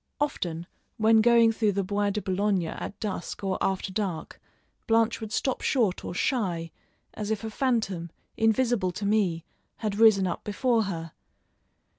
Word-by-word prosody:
Often, 175 Hz, -, -2 dB, 0.3 s
when 220 Hz, 0 st, +5 dB
going 235 Hz, 0 st, +5 dB
through 220 Hz, -2 st, +1 dB
the 200 Hz, +1 st, 0 dB
Bois 205 Hz, +2 st, 0 dB
de 210 Hz, +1 st, -3 dB
Boulogne 195 Hz, -1 st, +1 dB
at 165 Hz, -, -6 dB
dusk 205 Hz, -2 st, -4 dB
or 190 Hz, -1 st, -1 dB
after 190 Hz, 0 st, -1 dB
dark, 190 Hz, -6 st, -4 dB, 0.5 s
Blanche 225 Hz, 0 st, +2 dB
would 220 Hz, -1 st, -6 dB
stop 260 Hz, +2 st, -1 dB
short 225 Hz, -9 st, +1 dB
or -, -, -5 dB
shy, 180 Hz, -, -1 dB, 0.4 s
as 210 Hz, -1 st, -5 dB
if 220 Hz, 0 st, -2 dB
a 220 Hz, -, -4 dB
phantom, 215 Hz, -9 st, -1 dB, 0.3 s
invisible 225 Hz, -3 st, +2 dB
to 205 Hz, -, -4 dB
me, 195 Hz, -6 st, +1 dB, 0.3 s
had 210 Hz, -2 st, -3 dB
risen 215 Hz, -4 st, +6 dB
up 180 Hz, -, -3 dB
before 225 Hz, +1 st, +1 dB
her. 165 Hz, -4 st, -5 dB
205 Hz, 155 wpm, -27 LUFS, 185-225 Hz, 0.5 s, risen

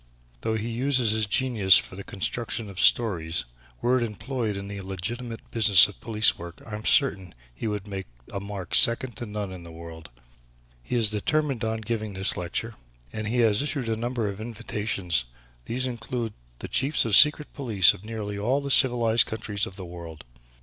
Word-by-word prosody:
Though 110 Hz, 0 st, -1 dB
he 110 Hz, +1 st, -3 dB
uses 125 Hz, -1 st, +1 dB
his 110 Hz, -1 st, 0 dB
genius 105 Hz, -5 st, +4 dB
for -, -, -2 dB
the 100 Hz, -, -8 dB
construction 110 Hz, +2 st, -4 dB
of 95 Hz, -, -8 dB
stories, 85 Hz, -, +2 dB, 0.4 s
were 125 Hz, +1 st, +3 dB
it -, -, 0 dB
employed 115 Hz, 0 st, -3 dB
in 100 Hz, 0 st, -6 dB
the 100 Hz, 0 st, -6 dB
legitimate 115 Hz, +5 st, -5 dB
business 105 Hz, -5 st, +6 dB
of 105 Hz, -, -14 dB
police 110 Hz, -1 st, +3 dB
work, 85 Hz, 0 st, -9 dB
I 110 Hz, -, -10 dB
am 105 Hz, +1 st, -6 dB
certain 95 Hz, -, +2 dB, 0.2 s
he 85 Hz, -, -5 dB
would 105 Hz, -2 st, -3 dB
make 95 Hz, -2 st, -6 dB, 0.3 s
a 100 Hz, -, -2 dB
mark 100 Hz, -3 st, -7 dB
second 120 Hz, 0 st, +4 dB
to 120 Hz, -, -5 dB
none 105 Hz, -2 st, -5 dB
in 90 Hz, -, -9 dB
the 85 Hz, -, -11 dB
world. 80 Hz, -1 st, -10 dB, 0.7 s
He -, -, -4 dB
is 110 Hz, -3 st, +2 dB
determined 135 Hz, +4 st, -1 dB
on 110 Hz, 0 st, -2 dB
giving 110 Hz, -1 st, -3 dB
this 95 Hz, +1 st, +5 dB
lecture 90 Hz, +6 st, -3 dB, 0.4 s
and 110 Hz, 0 st, -4 dB
he 120 Hz, +3 st, +1 dB
has 110 Hz, -1 st, +3 dB
issued 140 Hz, -5 st, -2 dB
a 110 Hz, -, 0 dB
number 120 Hz, 0 st, -2 dB
of 100 Hz, +1 st, -5 dB
invitations. 105 Hz, -, -2 dB, 0.4 s
These 125 Hz, -, -2 dB
include 120 Hz, -2 st, -4 dB, 0.2 s
the -, -, -7 dB
Chiefs 135 Hz, +2 st, +1 dB
of 115 Hz, -, -2 dB
the -, -, +8 dB
Secret 150 Hz, 0 st, +5 dB
Police 110 Hz, -10 st, +4 dB
of 90 Hz, -, -13 dB
nearly 105 Hz, -2 st, -5 dB
all 125 Hz, +7 st, +1 dB
the 140 Hz, -1 st, -4 dB
civilized 120 Hz, -4 st, +4 dB
countries 105 Hz, -2 st, -3 dB
of 95 Hz, -, -11 dB
the 95 Hz, -2 st, -8 dB
world. 85 Hz, -2 st, -10 dB
110 Hz, 190 wpm, -26 LUFS, 100-120 Hz, 0.7 s, the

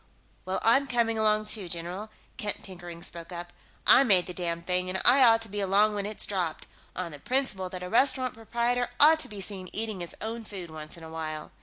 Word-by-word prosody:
"Well 185 Hz, +1 st, -2 dB
I'm 270 Hz, +5 st, +4 dB
coming 230 Hz, -2 st, 0 dB
along, 215 Hz, 0 st, +2 dB
too, 205 Hz, -4 st, 0 dB
general," 175 Hz, +5 st, -4 dB, 0.3 s
Kent 210 Hz, -4 st, -3 dB
Pickering 175 Hz, -3 st, -10 dB
spoke 170 Hz, +1 st, -7 dB
up. 175 Hz, 0 st, -7 dB, 0.3 s
"I -, -, +8 dB
made 195 Hz, -8 st, +5 dB
the 180 Hz, -, -6 dB
damned 170 Hz, -1 st, -3 dB
thing, 180 Hz, 0 st, +1 dB
and 190 Hz, +1 st, -2 dB
I 260 Hz, +3 st, +7 dB
ought 225 Hz, -2 st, +6 dB
to -, -, -2 dB
be 205 Hz, 0 st, -5 dB
along 200 Hz, +2 st, +3 dB
when 205 Hz, -1 st, -2 dB
it's 215 Hz, -, -3 dB
dropped, 180 Hz, -6 st, -2 dB, 0.3 s
on 180 Hz, -2 st, -4 dB
the 145 Hz, -, -10 dB
principle 210 Hz, -, -1 dB
that 180 Hz, 0 st, -7 dB
a -, -, -4 dB
restaurant 255 Hz, +4 st, +2 dB
proprietor 235 Hz, +2 st, -1 dB
ought 315 Hz, +2 st, +7 dB
to 260 Hz, -, 0 dB
be 205 Hz, -2 st, -7 dB
seen 190 Hz, -2 st, -5 dB
eating 215 Hz, -2 st, -1 dB
his 175 Hz, -1 st, -6 dB
own 225 Hz, +1 st, -5 dB
food 190 Hz, -6 st, -8 dB
once 155 Hz, +1 st, -9 dB
in 165 Hz, -, -12 dB
a 160 Hz, -, -9 dB
while." 155 Hz, -1 st, -5 dB
200 Hz, 220 wpm, -28 LUFS, 175-225 Hz, 0.3 s, I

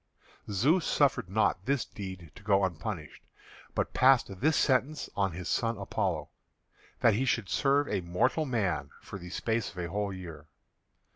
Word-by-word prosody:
Zeus 140 Hz, -, +3 dB
suffered 140 Hz, -10 st, +2 dB
not 95 Hz, 0 st, +1 dB
this 140 Hz, -2 st, +1 dB
deed 95 Hz, -6 st, -8 dB
to -, -, -14 dB
go 100 Hz, -1 st, +3 dB
unpunished, 85 Hz, -3 st, -5 dB, 0.5 s
but -, -, -1 dB
passed 125 Hz, -7 st, +4 dB
this 155 Hz, +3 st, +3 dB
sentence 140 Hz, +2 st, +1 dB
on 100 Hz, -3 st, +1 dB
his 90 Hz, +1 st, -6 dB
son 115 Hz, -1 st, 0 dB
Apollo, 100 Hz, -1 st, -2 dB, 0.7 s
that 115 Hz, -, +5 dB
he 115 Hz, +6 st, +1 dB
should 115 Hz, -6 st, 0 dB
serve 140 Hz, +4 st, +2 dB
a 95 Hz, -, -1 dB
mortal 90 Hz, -, +1 dB
man 95 Hz, -, -1 dB
for 95 Hz, -, -8 dB
the 90 Hz, 0 st, -9 dB
space 110 Hz, +4 st, -1 dB
of 90 Hz, -, -15 dB
a 85 Hz, -1 st, -3 dB
whole 100 Hz, 0 st, -1 dB
year. 85 Hz, -5 st, -9 dB
100 Hz, 160 wpm, -30 LUFS, 90-130 Hz, 0.7 s, that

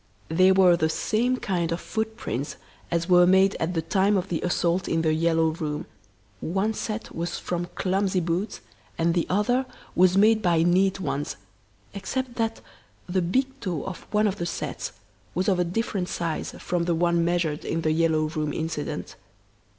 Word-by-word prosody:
They 185 Hz, +4 st, +5 dB
were 190 Hz, -2 st, +6 dB
the 160 Hz, -2 st, +1 dB
same 240 Hz, +9 st, +1 dB
kind 175 Hz, -7 st, -1 dB
of 170 Hz, -, -1 dB
footprints 220 Hz, -, -3 dB, 0.3 s
as 170 Hz, 0 st, 0 dB
were 180 Hz, -1 st, +6 dB
made 190 Hz, +1 st, +5 dB
at 170 Hz, +2 st, -1 dB
the 165 Hz, -, 0 dB
time 195 Hz, +4 st, +2 dB
of 190 Hz, +1 st, -2 dB
the 165 Hz, -, -1 dB
assault 175 Hz, 0 st, 0 dB
in 165 Hz, 0 st, +1 dB
"The 155 Hz, -1 st, +2 dB
Yellow 165 Hz, 0 st, +2 dB
Room" 155 Hz, -2 st, -3 dB, 0.5 s
one 195 Hz, +6 st, 0 dB
set 215 Hz, +1 st, -4 dB
was 170 Hz, +1 st, -3 dB
from 175 Hz, 0 st, -3 dB
clumsy 190 Hz, 0 st, +1 dB
boots 175 Hz, +5 st, -2 dB, 0.4 s
and 165 Hz, +1 st, +2 dB
the 170 Hz, -1 st, 0 dB
other 245 Hz, +7 st, +1 dB, 0.3 s
was 185 Hz, +1 st, +4 dB
made 215 Hz, +2 st, +5 dB
by 170 Hz, -4 st, +3 dB
neat 185 Hz, +3 st, +3 dB
ones, 145 Hz, -5 st, -2 dB, 0.6 s
except 250 Hz, +5 st, -3 dB
that 225 Hz, -1 st, -1 dB, 0.5 s
the 185 Hz, +1 st, +1 dB
big 260 Hz, +10 st, 0 dB
toe 175 Hz, -7 st, -3 dB
of 185 Hz, -, -7 dB
one 210 Hz, 0 st, +2 dB
of 200 Hz, -1 st, 0 dB
the 170 Hz, -, -2 dB
sets -, -, -4 dB, 0.4 s
was 185 Hz, +2 st, 0 dB
of 190 Hz, -3 st, +3 dB
a -, -, +4 dB
different 185 Hz, 0 st, -2 dB
size 165 Hz, -2 st, -3 dB
from 175 Hz, -1 st, -1 dB
the 170 Hz, -1 st, +1 dB
one 170 Hz, 0 st, +2 dB
measured 170 Hz, -3 st, 0 dB
in 165 Hz, -, -2 dB
"The 155 Hz, -, +1 dB
Yellow 160 Hz, -1 st, +2 dB
Room" 155 Hz, -2 st, -2 dB
incident. 150 Hz, -, -4 dB
175 Hz, 175 wpm, -25 LUFS, 165-195 Hz, 0.6 s, were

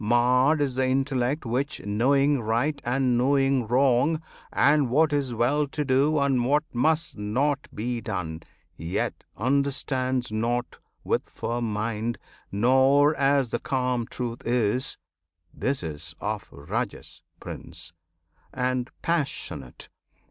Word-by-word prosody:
Marred 125 Hz, +6 st, +3 dB
is 140 Hz, -3 st, +1 dB
the 130 Hz, +1 st, +1 dB
Intellect 135 Hz, +1 st, 0 dB
which, 130 Hz, +5 st, -1 dB
knowing 135 Hz, +6 st, +2 dB
right 120 Hz, +7 st, 0 dB
And 125 Hz, 0 st, +1 dB
knowing 135 Hz, -2 st, +2 dB
wrong, 130 Hz, +5 st, +3 dB, 0.3 s
and 145 Hz, -2 st, +3 dB
what 150 Hz, +4 st, +3 dB
is 135 Hz, -4 st, 0 dB
well 140 Hz, +6 st, +2 dB
to 150 Hz, +1 st, -3 dB
do 140 Hz, +4 st, +3 dB
And 135 Hz, -3 st, +2 dB
what 145 Hz, +5 st, +2 dB
must 155 Hz, +1 st, +1 dB
not 135 Hz, +7 st, 0 dB
be 120 Hz, +2 st, -3 dB
done, 90 Hz, -6 st, -4 dB, 0.3 s
yet 80 Hz, +2 st, -3 dB
understands 130 Hz, 0 st, 0 dB
Nought 120 Hz, +3 st, -1 dB, 0.2 s
with -, -, -1 dB
firm 120 Hz, -1 st, -3 dB
mind, 110 Hz, +2 st, -2 dB, 0.3 s
nor 130 Hz, +7 st, +4 dB
as 135 Hz, -3 st, +2 dB
the 120 Hz, -, 0 dB
calm 125 Hz, -3 st, -1 dB
truth 120 Hz, -1 st, -5 dB
is: 120 Hz, +2 st, 0 dB, 0.6 s
This 135 Hz, -6 st, -1 dB
is 80 Hz, +1 st, -6 dB
of 105 Hz, +1 st, -3 dB
Rajas, 100 Hz, -, -5 dB, 0.2 s
Prince! 80 Hz, -, -7 dB, 0.6 s
and 125 Hz, -1 st, -1 dB
"passionate!" 115 Hz, -, -2 dB
125 Hz, 120 wpm, -26 LUFS, 115-140 Hz, 0.6 s, nor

